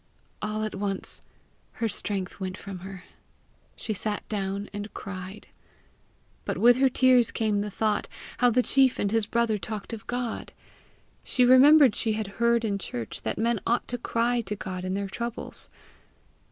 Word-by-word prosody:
All 215 +1 -2
at 215 - -3
once 195 0 -3 0.5
her 230 - -1
strength 200 -3 -2
went 185 0 -4
from 195 -2 -7
her. 190 0 -9 0.7
She 220 - -3
sat 210 +1 -4
down 200 -1 -3
and 205 +1 -5
cried. 190 +1 -7 0.9
But - - -3
with 245 +1 +6
her 265 0 +4
tears 255 -2 +4
came 210 -2 0
the 210 - -3
thought 210 +1 0 0.3
how 245 0 +5
the 250 +2 +3
chief 265 -1 +3
and 200 - 0
his 225 -2 +1
brother 230 -2 +1
talked 210 +4 -6
of 220 - -8
God. 245 -2 -3 0.7
She 250 - +2
remembered 265 0 +7
she 220 - +1
had 215 0 -2 0.2
heard 235 0 +3
in 200 -2 -1
church 120 - -5
that - - -3
men 230 0 +1
ought 235 +1 +1
to 245 - -3
cry 235 +1 +1
to 210 - -1
God 185 -2 -5
in 185 +1 -1
their 200 0 -2
troubles. 235 +4 -5
215 Hz, 165 wpm, -27 LUFS, 200-235 Hz, 0.9 s, remembered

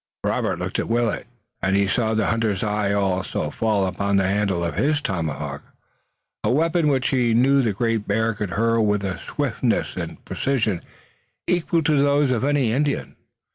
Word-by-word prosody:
Robert - - 0
looked - - -3
at - - -3
Willet, 115 -1 0 0.3
and 95 +1 +1
he 100 0 +3
saw 110 +1 +1
the 110 -2 +1
hunter's 110 -4 0
eye 105 -1 0
also 95 -2 -1
fall 105 -3 +1
upon 100 +2 -1
the 95 -1 +2
handle 100 -3 0
of 85 - -2
his 145 - +1
tomahawk, 85 - -3 0.8
a - - +1
weapon 165 +4 +2
which 135 -3 +2
he 120 -4 +2
knew 135 +3 +4
the 115 -4 +1
Great 115 +1 -1
Bear 110 +2 +1
could 105 -2 -4
hurl 115 +4 +2
with 105 -1 +1
a 95 -2 -3
swiftness - - -1
and - - -6
precision 115 -9 -1 0.6
equal 170 -2 +1
to 150 -2 +3
those 145 -1 +3
of 125 -1 0
any 140 -5 +2
Indian. 145 +2 -1
110 Hz, 175 wpm, -23 LUFS, 100-135 Hz, 0.8 s, knew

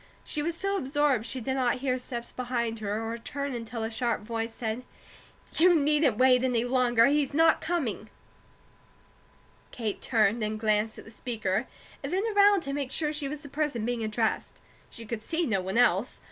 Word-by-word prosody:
She 300 - -4
was 330 +2 -1
so 395 +2 -1
absorbed 275 - +1
she 260 - 0
did 265 +4 -2
not 255 -2 +1
hear 255 0 -1
steps 240 -1 -6
behind 235 -3 -2
her 215 +1 -2
or 230 +1 -4
turn 280 +3 -4
until 230 -1 -5
a 225 - -3
sharp 235 0 -1
voice 225 +1 -3
said: 225 +1 -4 0.7
"You 350 +2 +5
needn't 295 -5 +3
wait 255 0 +5
any 245 -3 +1
longer. 245 -2 +4
He's 285 0 +1
not 325 +1 +4
coming!" 270 - -2 1.6
Kate 220 -4 -4
turned 225 -1 +2
and 215 0 -2
glanced 215 0 +1
at - - -11
the 225 - -12
speaker, 220 -2 -2 0.3
and - - -5
then 380 +3 +1
around 405 -1 +6
to 275 -4 -3
make 280 -2 -3
sure 300 -1 0
she 295 -2 -2
was 295 +1 -6
the 285 - -9
person 280 -7 -1
being 240 -1 -1
addressed. 220 +1 -1 0.3
She 230 - -11
could 220 0 -4
see 330 +8 -1
no 195 -8 0
one 190 +4 -3
else. 240 -1 +3
245 Hz, 190 wpm, -28 LUFS, 225-285 Hz, 1.6 s, around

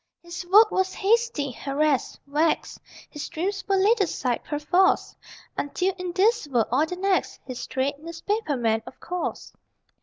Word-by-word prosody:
His 345 +1 -7
work 425 +2 +8
was 375 0 0
hasty, 430 - +1
harassed, 280 +2 0
vexed: 300 +3 0 0.3
His 295 - -7
dreams 380 +4 -2
were 395 - +2
laid 410 +4 +3
aside, 260 -9 -1
perforce, 355 +6 +1 0.4
Until 365 +6 -1
in 365 -1 -4
this 420 0 +2
world, 240 -6 +1
or 310 - +3
the 360 - -4
next.... 380 +1 0
(His 255 -2 -6
trade? 275 +2 -1
Newspaper 335 +1 -2
man, 225 -2 +1
of - - -11
course!) 360 0 -4
345 Hz, 150 wpm, -25 LUFS, 285-385 Hz, 0.4 s, work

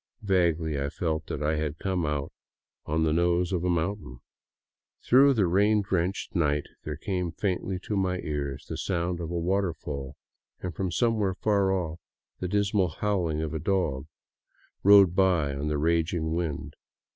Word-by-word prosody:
Vaguely 85 -6 +1
I 70 - -1
felt 80 0 -2
that 75 - -4
I 75 +1 +1
had 75 0 -2
come 90 -4 -1
out 75 -2 -2 0.5
on 80 +2 +1
the 80 -1 +2
nose 85 +2 +2
of 90 -2 0
a 90 - +1
mountain. 85 -5 -2 0.9
Through 135 +2 +6
the 105 -4 +3
rain 100 +4 +3
drenched 95 0 -1
night 75 -4 +2 0.2
there - - -5
came 90 -3 -2
faintly 95 +1 -2
to 105 - -3
my 95 -2 0
ears 70 -3 -4
the - - -5
sound 85 -2 -1
of 85 -2 -4
a 85 - -2
waterfall, 85 -7 -2 0.4
and 90 -1 -5
from 95 +3 -2
somewhere 110 -3 +1
far 100 -2 +2
off 85 -3 -2 0.4
the 90 - -2
dismal 100 0 +1
howling 85 -3 -1
of 80 - -4
a 80 - -2
dog 80 -7 -1 0.7
rode 100 -3 +7
by 90 -7 +3
on 70 +2 -3
the 75 -1 0
raging 80 +1 0
wind. 75 -4 -3
85 Hz, 165 wpm, -27 LUFS, 80-95 Hz, 0.9 s, rode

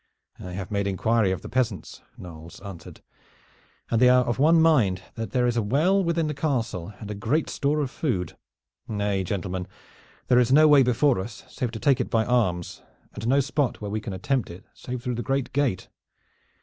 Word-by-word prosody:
"I 90 -1 -8
have 95 +1 -6
made 100 -1 0
inquiry 105 +2 +1
of 95 - -3
the - - -7
peasants," 120 -6 -2 0.2
Knolles 85 -1 -11
answered, 95 -6 -10 0.9
"and 115 - +2
they 125 - +7
are 125 0 +5
of 120 +1 -2
one 160 +4 +5
mind 120 - +3
that 115 -1 -5
there 125 -2 +1
is 120 -1 0
a - - +3
well 160 - +2
within 170 -1 0
the 150 - -2
castle, 115 - -2
and 105 -1 -7
good 140 +9 0
store 150 +2 0
of 135 -3 -3
food. 95 - -2 0.5
Nay, 100 -2 -1
gentlemen, 90 -1 -3 0.6
there 125 0 +5
is 125 0 +2
no 155 +3 +7
way 145 -2 +7
before 125 0 +2
us 100 +2 -7
save 125 - -3
to 110 - -5
take 135 -1 +3
it - - -4
by 110 -1 +1
arms, 95 -9 0 0.3
and 115 - -5
no 135 +3 +4
spot 140 -2 -1
where 105 -1 -5
we 110 +1 -2
can 105 - -6
attempt 125 +7 -1
it 85 +3 -11
save 125 -1 -7
through 125 -1 -2
the 120 - -3
great 135 +3 -2
gate. 140 -10 0
120 Hz, 200 wpm, -25 LUFS, 100-135 Hz, 0.9 s, they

